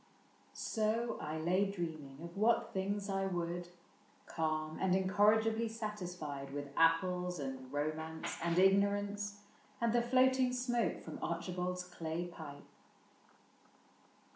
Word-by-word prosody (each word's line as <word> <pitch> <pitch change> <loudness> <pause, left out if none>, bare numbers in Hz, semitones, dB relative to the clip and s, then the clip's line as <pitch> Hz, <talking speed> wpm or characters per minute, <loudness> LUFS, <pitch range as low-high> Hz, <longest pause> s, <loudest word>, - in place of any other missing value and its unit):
So 225 +1 0
I 155 +1 -3
lay 185 +5 +2
dreaming 160 -8 -5
of 170 0 -8
what 230 +3 +2
things 200 +1 -1
I 195 -1 0
would, 175 -1 -2 0.6
Calm 155 -1 -2
and 185 -1 +3
incorrigibly 215 +4 +3
satisfied 180 -11 -5
With 145 0 -5
apples 180 +2 +3
and 130 -2 -5
romance 155 +2 -2
and 170 0 +1
ignorance, 205 +2 +3 0.4
And 235 -1 +2
the 240 - +4
floating 255 +1 +4
smoke 245 -2 0
from - - -7
Archibald's 180 +1 -2
clay 170 -1 -4
pipe. 155 -5 -9
180 Hz, 115 wpm, -35 LUFS, 160-210 Hz, 0.6 s, the